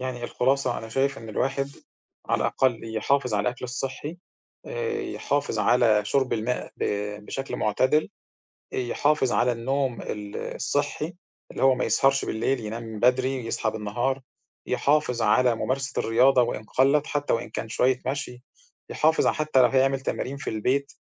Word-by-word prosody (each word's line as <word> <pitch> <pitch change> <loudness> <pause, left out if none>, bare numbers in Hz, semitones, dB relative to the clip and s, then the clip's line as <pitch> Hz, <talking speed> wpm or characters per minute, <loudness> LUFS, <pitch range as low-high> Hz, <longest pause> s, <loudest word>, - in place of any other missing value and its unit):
يعني 125 -2 -4
الخُلاصة 130 0 +1
أنا 115 - -8
شايف 135 +3 0
إن 115 0 -10
الواحد 135 +5 -1 0.6
على - - +1
الأقل 125 -4 +1 0.2
يحافظ 125 +1 +1
على 105 +2 +1
الأكل 125 +1 -5
الصحّي 135 +6 -5 0.5
آآ، 465 -2 -2
يحافظ 345 - -2
على 115 -4 +4
شُرب 130 +4 +1
الماء 115 +2 -2
ب - - -2 0.4
بشكْل 135 0 -4
معتدِل، 130 +8 +2 0.7
أ - - -2
يحافظ 130 +2 +1
على 120 +1 +3
النوم 130 +1 -1
ال 105 -1 -6
الصحّي 145 +4 -2 0.4
اللي - - -5
هو 135 -1 +6
ما 125 - -1
يسهَرش 135 +5 +3
بالليل، 120 +4 -1
ينام 110 0 -6
بدري، 130 0 +2
يصحى 115 -1 -1
بالنهار، 120 +6 -2 0.4
يحافظ 140 -5 +1
على 120 +3 +4
ممارسة 135 +4 -2
الرياضة 125 +3 +4
وإن 120 -2 -2
قلَّت، 135 +6 +2
حتى 145 0 -1
وإن 115 - -1
كان 110 - -5
شوية 125 +3 +2
مشي، 130 -2 -4 0.5
يحافظ 160 +1 +2
حتى 155 -3 +2
لو 125 - +6
هيعمل 135 +1 +2
تمارين 135 +1 -3
في 145 - -4
البيت، 130 +6 0
130 Hz, 150 wpm, -25 LUFS, 115-140 Hz, 0.7 s, هو